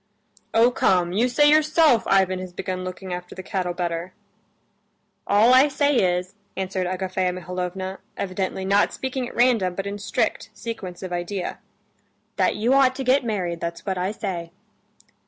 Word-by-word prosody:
"Oh, 230 +2 +5
come, 180 -6 +2
you 235 +6 +2
say 295 +4 +4
yourself 305 -5 +4
Ivan 190 -1 +3
has 185 -1 -7
begun 185 0 -4
looking 185 0 -6
after 180 0 -7
the 185 - -7
cattle 180 -2 -2
better." 175 0 -3 1.1
"All 215 +5 +5
I 260 +3 +7
say 285 -1 +1 0.2
is," 180 +1 -6 0.2
answered 185 -1 -2
Agafea 185 0 -1
Mihalovna, 180 +1 -5 0.2
evidently 190 0 -3
not 200 +2 +3
speaking 260 -1 -3
at - - -13
random, 230 -7 +3
but 195 - -3
in 200 +1 -4
strict 200 - -1
sequence 195 -6 -7
of 185 -1 -5
idea, 175 +1 -3 0.8
"that - - +2
you 235 +5 +1
ought 265 -1 +4
to 265 - -4
get 260 +2 +3
married, 185 -7 -2
that's 170 0 -5
what 190 -2 -2
I 185 +2 -1
say." 185 -6 -4
190 Hz, 160 wpm, -23 LUFS, 180-235 Hz, 1.1 s, I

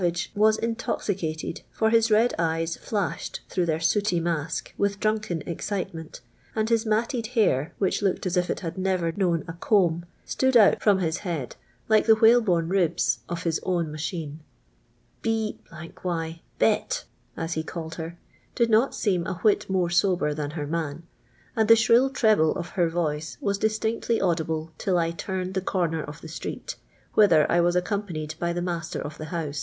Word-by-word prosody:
ig 175 +1 -1
wa^ 215 +1 +4
into.vicattrd, 190 -8 -3
for 220 0 +1
his 230 0 +4
red 220 +3 +4
eyfs 165 0 0 0.2
H'»*hed 205 -4 -2
through 180 -2 0
his 160 0 0
sooty 200 0 +2
mask 165 -2 -2
with 200 0 0
dnniken 215 -7 -1
e\cit'fm''nt, 170 -2 -4 0.3
and 220 0 0
his 225 0 +2
matted 225 +2 0
hair, 150 - +2
which 195 0 0
looked 195 -2 0
as 185 0 0
if 180 0 +1
it - - -3
h:id 170 +2 -4
never 185 -3 0
known 170 -2 0
a 165 - -5
comb, 170 -2 +2 0.2
stood 260 -1 +2
out 210 -3 +6
friim 195 -3 +3
Ills 160 0 0
head 165 - -4 0.3
like 215 0 +4
tlie 220 -1 +7
whnlebnne 220 -7 +4
ribs 175 -4 +1
of 170 -1 -4
his 165 -2 0
own 175 -4 -1
maiiiine. 155 -1 -4 0.5
" 120 0 -39
li 225 -1 -1
— - - -29
y 165 0 -9 0.7
Hot." - - +1 0.3
as 165 +1 -2
he 160 - -2
calleil 160 0 -6
her, 165 +1 -6 0.4
did 235 -1 +2
not 225 +5 +4
►e:'m 185 -4 0
a 185 - -2
wliit 210 -1 +3
more 180 -2 +1
sober 175 -4 +2
than 145 -1 -3
her 145 - -2
man; 160 0 -3 0.5
and 220 -1 +2
the 230 - +9
y'lir'.ll 230 +4 +4
treble 215 -11 +3
of 170 - -5
h - - -17
r 170 -1 +4
voice 160 -2 -2
was 200 -1 -1
distinctly 220 +2 0
audible 160 -3 -1
till 185 -2 +1
I 165 -1 +1
turned 185 +2 -4
the 190 - 0
corner 170 -4 -1
of 150 +2 -9
the - - -9
street, 160 - -6 0.4
whither 170 -8 +6
I 175 - +4
was 175 +1 +2
accimipanied 180 -5 -2
by 170 0 0
the 175 0 -2
nia&ter 170 -2 -3
of 150 +1 -7
the 155 - -5
hou 160 -2 -3
e. - - -8
175 Hz, 185 wpm, -26 LUFS, 165-210 Hz, 0.7 s, the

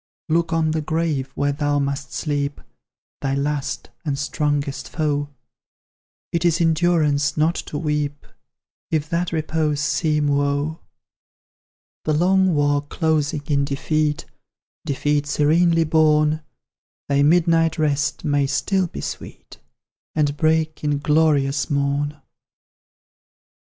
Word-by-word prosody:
"Look 165 +1 +1
on 160 -1 +1
the 155 0 -1
grave 155 -4 -1
where 145 0 +1
thou 145 0 0
must 140 -1 -2
sleep 145 +3 -2 0.6
Thy 135 -1 0
last, 140 0 -2
and 145 -4 -2
strongest 145 -1 -2
foe; 145 -2 -1 1.0
It 170 0 0
is 170 -1 +2
endurance 160 -3 +2
not 155 +2 +3 0.2
to 145 - -4
weep, 150 -2 -2 0.6
If 155 -2 0
that 170 +1 0
repose 155 -2 -1
seem 150 0 +1
woe. 145 +2 0 1.3
"The 155 - +1
long 185 +2 +3
war 145 -1 +2
closing 150 0 -1
in 140 -1 +1
defeat 150 +2 -1 0.6
Defeat 145 +1 0
serenely 165 +4 +3
borne, 155 -1 +3 0.7
Thy 140 0 +2
midnight 165 +1 +3
rest 150 +1 0
may 145 -2 +2
still 185 +6 0
be - - -7
sweet, - - -8 0.6
And 145 -2 +1
break 155 0 +1
in 145 -1 +1
glorious 150 -1 +2
morn!" 145 +1 -1
150 Hz, 115 wpm, -22 LUFS, 145-160 Hz, 1.3 s, not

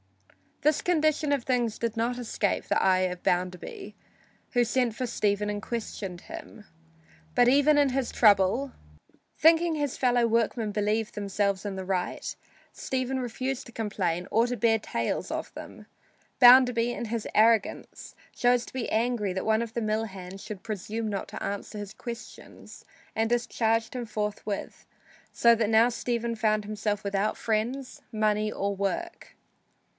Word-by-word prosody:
This 305 0 +3
condition 310 -3 +2
of 280 -4 +1
things 240 -4 0
did 230 -1 -2
not 235 +2 0
escape 220 -4 -1
the - - +1
eye 185 -1 +4
of 180 0 -7
Bounderby, 180 - -2 0.6
who 245 - +3
sent 240 -1 0
for 255 +1 -2
Stephen 210 -2 0
and 205 0 -3
questioned 205 -6 -5
him. 210 - -10 0.7
But 245 - +5
even 285 +3 +5
in 285 -1 +4
his 260 -1 -1
trouble, 210 +5 +4 0.7
thinking 330 +1 +5
his 290 -3 -2
fellow 245 -2 +3
workmen 230 -1 0
believed 210 +2 -1
themselves 200 -1 -1
in 200 -1 -3
the 190 -1 -5
right, 185 -1 -2 0.4
Stephen 260 0 -2
refused 255 +2 -3
to - - -12
complain 190 -6 -2
or 225 +2 +4
to 245 0 -3
bear 230 -1 +3
tales 115 - -2
of - - -4
them. - - -10 0.5
Bounderby, 245 -1 +7
in 240 - -4
his 225 0 -3
arrogance, 220 -1 +1 0.2
chose 245 0 +2
to - - -12
be 255 -2 -3
angry 225 -3 0
that 190 - -3
one 220 +1 +2
of 225 -1 -8
his 235 - -2
mill 215 +1 0
hands 190 -2 -9
should 200 -2 -8
presume 220 +1 -4
not 200 -2 -3
to - - -7
answer 200 +2 -4
his 205 0 -7
questions 235 0 -10 0.3
and 225 0 +1
discharged 225 -1 0
him 245 -1 -3
forthwith, 210 -1 -4 0.5
so 235 0 +5
that 220 -2 0
now 225 +2 +5
Stephen 235 -1 -2
found 215 -1 +1
himself 210 0 -2
without 200 +1 -1
friends, 240 +5 -2
money 215 -1 +1
or 200 -1 -2
work. 200 - -4
225 Hz, 155 wpm, -27 LUFS, 205-245 Hz, 0.7 s, Bounderby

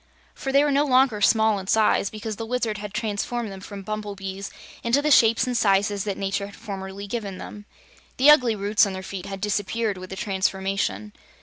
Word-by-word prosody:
For 270 - -4
they 280 +1 +5
were 295 - +1
no 280 +1 +3
longer 255 -6 +3
small 220 -1 +4
in 190 - -9
size, 215 -2 +3
because 215 -1 -6
the 225 - -4
Wizard 230 -3 -1
had 210 -1 -6
transformed 220 +1 -3
them 190 -1 -9
from 200 0 -8
bumblebees 200 -2 -5 0.3
into 235 +4 +3
the 300 +1 0
shapes 230 -2 +5
and 250 -1 -2
sizes 200 -2 +2
that 200 -2 -3
nature 195 0 -2
had 200 - -13
formerly 195 0 -7
given 200 -3 -5
them. 205 +2 -10 0.5
The 280 +4 +7
ugly 250 -7 +4
roots 205 +1 +2
on 195 - -4
their 190 0 -6
feet 190 -1 -7
had 195 -1 -6
disappeared 210 0 -1
with 185 0 -9
the 190 - -6
transformation. 190 - -2
205 Hz, 200 wpm, -24 LUFS, 195-230 Hz, 0.5 s, The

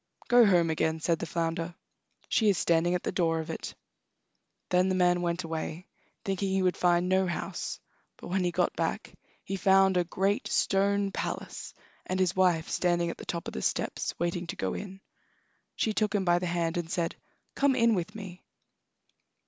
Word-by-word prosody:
"Go 240 -2 +7
home 170 -4 +4
again," 160 0 0
said 165 0 0
the 170 - -4
flounder; 165 +1 -2 0.5
"she 220 -2 +3
is 195 - +2
standing 170 +2 +2
at 180 - -2
the - - -1
door 165 -2 +1
of 160 - -4
it." - - -6 0.9
Then 180 +1 +3
the 185 - +1
man 180 -1 +3
went 175 +1 -1
away, 160 +1 -4 0.4
thinking 195 0 -1
he 190 0 +1
would 180 -1 +2
find 175 0 +2
no 190 0 +2
house, 175 - -4 0.4
but - - -10
when 185 +1 +1
he 175 - +2
got 175 - 0
back - - -2 0.3
he 195 - -3
found 190 0 +4
a 180 - +3
great 195 +4 0
stone 200 0 +1
palace, - - -5 0.3
and 185 +1 -1
his 185 -1 +2
wife 180 -4 +3
standing 175 -1 +1
at - - -10
the - - -8
top 170 -1 -4
of - - -6
the 65 - -4
steps, - - -1
waiting 175 0 -2
to - - -4
go 95 - -2
in. 195 -1 -7 0.7
She 220 - 0
took 215 -1 0
him 195 -2 +1
by 175 0 +4
the 180 - -2
hand 170 0 -1
and 170 -2 -3
said: 170 -2 -1 0.4
"Come 275 -1 +2
in 230 -2 +4
with 195 +2 -2
me." 190 -4 -9
180 Hz, 190 wpm, -29 LUFS, 170-195 Hz, 0.9 s, Go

